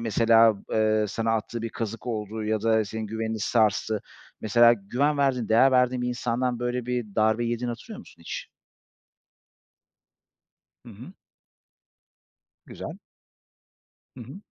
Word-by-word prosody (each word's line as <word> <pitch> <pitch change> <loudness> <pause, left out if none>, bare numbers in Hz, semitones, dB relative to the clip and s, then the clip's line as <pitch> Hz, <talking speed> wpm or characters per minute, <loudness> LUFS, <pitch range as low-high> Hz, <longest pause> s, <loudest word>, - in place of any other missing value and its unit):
mesela, 115 0 +4 0.2
eee, 110 0 +2
sana 115 +2 -1
attığı 115 +1 -3
bir 115 - -2
kazık 115 +1 -6
oldu 110 -2 -4
ya 110 0 -1
da 110 -1 +2
senin 110 +2 -5
güvenini 110 +1 -3
sarstı. 110 -1 +1 0.4
Mesela 120 +2 +5
güven 125 +8 -1
verdiğin, 130 -5 +1
değer 120 +4 +5
verdiğin 125 0 +2
bir 125 - -1
insandan 120 0 -1
böyle 125 0 -3
bir 125 -1 -1
darbe 110 +2 +2
yediğini 120 +1 -2
hatırlıyor 205 - -7
musun 230 - -15
hiç? 85 - -7 2.4
Hı - - -11
hı. 120 - -11 1.5
Güzel. - - -8 1.2
Hı - - -8
hı. 140 - -11
115 Hz, 130 wpm, -26 LUFS, 110-125 Hz, 2.4 s, Mesela